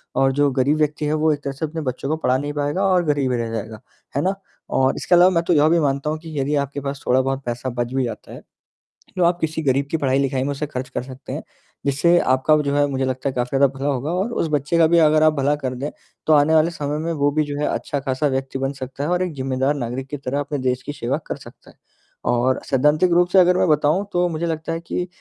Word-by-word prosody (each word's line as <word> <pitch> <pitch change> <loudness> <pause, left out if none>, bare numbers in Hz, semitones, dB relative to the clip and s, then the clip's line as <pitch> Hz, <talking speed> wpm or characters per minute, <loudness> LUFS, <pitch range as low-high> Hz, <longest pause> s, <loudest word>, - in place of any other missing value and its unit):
और 135 0 +3
जो 145 +1 +2
गरीब 135 +3 +1
व्यक्ति 150 0 0
है 150 - 0
वो 155 0 +2
एक 145 - -5
तरह 140 - -3
से 140 - -3
अपने 160 +1 -5
बच्चों 130 0 -4
को 155 - +1
पढ़ा 130 -4 +1
नहीं 145 +1 -4
पाएगा 145 +6 -1
और 185 -2 +3
गरीब 145 -3 +1
रह 115 -2 -2
जाएगा। 110 -1 -5 0.4
है 140 - +1
ना? 190 - +1 0.4
और 130 0 +2
इसके 180 - +2
अलावा 180 +2 +6
मैं 170 -1 +1
तो 175 +1 +1
यह 150 0 +4
भी 170 - +3
मानता 140 0 0
हूँ 155 - -2
कि 160 -3 -6
यदि 145 +2 0
आपके 140 0 -2
पास 140 +1 -5
थोड़ा-बहुत 130 +2 +1
पैसा 120 +2 -3
बच 120 0 -3
भी 135 -1 +1
जाता 120 - -6
है, - - -10 0.8
तो 180 - +2
आप 170 +1 +3
किसी 160 0 -1
गरीब 140 +1 +1
की 160 - +1
पढ़ाई-लिखाई 135 -2 0
में 140 - -2
उसे 140 +2 -3
खर्च 130 -2 -5
कर 125 -1 -4
सकते 130 0 -9
हैं। - - -5 0.4
जिससे 145 +5 +3
आपका 130 +4 +2
व 150 - +2
जो 140 - -1
है 145 0 +4
मुझे 135 -1 -1
लगता 130 +1 -2
है 130 - -5
काफ़ी 125 +2 -1
ज़्यादा 140 +1 +5
भला 140 - -2
होगा 140 +1 -1
और 190 +6 -1
उस 165 - 0
बच्चे 150 +3 0
का 165 - +6
भी 170 +1 +3
अगर 155 0 +4
आप 155 0 +5
भला 145 0 +1
कर 130 -3 -4
दें, 140 +4 -4 0.4
तो 155 - +5
आने 150 +2 +4
वाले 160 +2 +4
समय 150 -2 -3
में 165 +2 -2
वो 145 -1 +1
भी 155 +1 +1
जो 145 0 -5
है 150 - 0
अच्छा-खासा 140 +1 -1
व्यक्ति 135 0 -2
बन 135 0 -1
सकता 135 +1 -6
है 150 - -1
और 180 0 +1
एक 180 -4 -4
ज़िम्मेदार 130 +1 0
नागरिक 130 +1 -4
की 145 - -4
तरह 140 +1 -3
अपने 145 +1 -3
देश 130 0 -1
की 145 - -5
सेवा 130 0 -2
कर - - -3
सकता - - -15
है। - - -27 0.6
और 125 +2 +1
सैद्धांतिक 150 +6 +3
रूप 175 0 +4
से 190 +1 +5
अगर 180 0 +5
मैं - - +2
बताऊँ 150 +6 +2
तो 175 0 +2
मुझे 165 0 -3
लगता 160 0 -3
है 165 - -3
कि 175 +1 -3
145 Hz, 270 wpm, -21 LUFS, 130-155 Hz, 0.8 s, अलावा